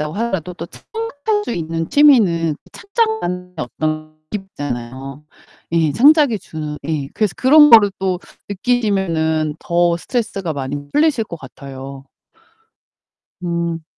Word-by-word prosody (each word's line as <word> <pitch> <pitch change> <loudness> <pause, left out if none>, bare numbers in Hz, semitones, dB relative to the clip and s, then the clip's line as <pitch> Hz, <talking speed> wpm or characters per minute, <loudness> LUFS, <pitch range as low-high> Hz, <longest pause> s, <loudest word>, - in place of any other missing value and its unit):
있다고 150 +1 -3
하더라도 190 -6 -2
또 - - -7
창작할 435 -2 -3
수 - - -3
있는 165 -2 -3
취미는 190 - +4 0.2
창작만의 400 - -2
어떤 155 +3 -3 0.2
느낌이 205 -2 -3
있쟎아요. 135 +1 -5 0.5
예 160 -3 +2
창작이 285 -3 +5
주는 155 -4 -6
예 150 -4 -2
그래서 215 -4 0
그런 295 +3 +7
거를 210 -3 +8
또 185 -2 -1 0.3
느끼시면은 185 -9 0
더 170 0 +2
스트레스가 195 -4 -3
많이 140 0 -4 0.2
풀리실 295 -7 +2
것 170 - -8
같아요. 135 0 -10 1.4
음. 170 -1 -2
170 Hz, 285 characters per minute, -19 LUFS, 155-230 Hz, 1.4 s, 거를